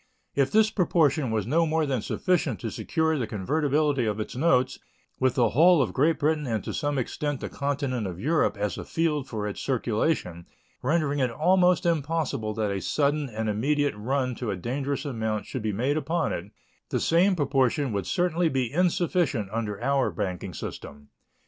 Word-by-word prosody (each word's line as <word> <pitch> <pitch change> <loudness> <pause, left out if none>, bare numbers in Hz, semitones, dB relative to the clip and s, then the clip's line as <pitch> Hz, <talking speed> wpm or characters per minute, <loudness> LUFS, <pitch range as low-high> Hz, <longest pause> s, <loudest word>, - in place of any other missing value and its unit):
If 140 -1 +2
this 215 0 +4
proportion 155 - +2
was 110 -3 -1
no 165 +7 +2
more 160 0 +1
than 130 -5 -1
sufficient 160 - 0
to 115 - -3
secure 160 -2 0
the 120 - -2
convertibility 140 +4 0
of 105 0 -1
its 110 - -5
notes 130 -2 +2 0.4
with 130 -1 +2
the 120 -3 +3
whole 170 +7 +5
of 130 - 0
Great 155 +5 +2
Britain 150 -1 0
and 110 -4 -1
to - - -5
some 145 -1 -1
extent 145 +2 -2
the - - -5
continent 140 -5 -2
of 90 -1 -6
Europe 155 - +1
as 105 0 -2
a - - -5
field 150 -4 -1
for 105 -2 -3
its 105 - -5
circulation, 110 - -1 0.3
rendering 145 0 +1
it 130 -2 +2
almost 180 +8 +3
impossible 155 -9 -1
that 110 -2 -1
a 100 -1 -2
sudden 145 -1 0
and 110 -1 -3
immediate 145 +7 +1
run 130 +4 -1
to 120 -1 -4
a 100 - -1
dangerous 135 - -3
amount 110 -6 -2
should 130 - -5
be 110 0 -1
made 130 +9 0
upon 160 +3 -1
it, 85 - -4 0.4
the - - 0
same 185 +4 +3
proportion 135 -3 +1
would 100 -1 -2
certainly 175 -2 +1
be 130 -3 -1
insufficient 175 - +1
under 110 -2 -3
our 140 0 +2
banking 95 -3 -4
system. 70 -1 -8
140 Hz, 180 wpm, -26 LUFS, 110-155 Hz, 0.4 s, whole